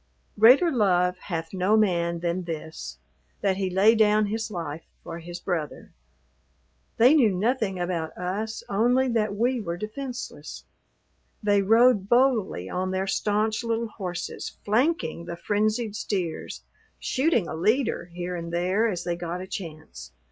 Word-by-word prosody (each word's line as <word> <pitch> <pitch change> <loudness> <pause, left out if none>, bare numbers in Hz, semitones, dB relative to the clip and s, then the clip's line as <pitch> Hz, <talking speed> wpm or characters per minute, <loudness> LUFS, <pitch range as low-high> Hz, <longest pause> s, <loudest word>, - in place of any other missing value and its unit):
"Greater 260 +10 +7
love 180 - +2
hath 165 -2 -4
no 190 +3 +2
man 170 -5 +1
than 175 +1 -2
this: 160 - -6 0.4
that 195 -2 +1
he 190 -1 -1
lay 195 +5 +5
down 215 -1 +4
his 220 +2 -3
life 165 -5 -6 0.2
for 165 - -7
his 175 +1 -8
brother." 165 -5 -4 1.0
They 245 +5 +6
knew 265 -8 +5
nothing 200 0 0
about 175 -3 -3
us 205 +5 -3
only 245 +6 +2
that 215 -3 0
we 240 +3 +1
were 170 -4 -4
defenseless. 245 +6 -7 0.8
They 205 -1 +3
rode 225 0 +4
boldly 240 - +2
on 185 - -2
their 190 +1 -1
stanch 215 +3 0
little 230 0 -1
horses 180 -5 -6
flanking 215 - 0
the 170 - -5
frenzied 215 +3 -1
steers, 185 -6 -3 0.3
shooting 260 - +1
a - - -5
leader 215 - +1
here 175 +1 -5
and 170 -1 -5
there 185 +6 +1
as 180 -4 -3
they 175 -1 -1
got 175 0 -4
a 185 - -6
chance. 155 - -8
195 Hz, 145 wpm, -26 LUFS, 175-225 Hz, 1.0 s, Greater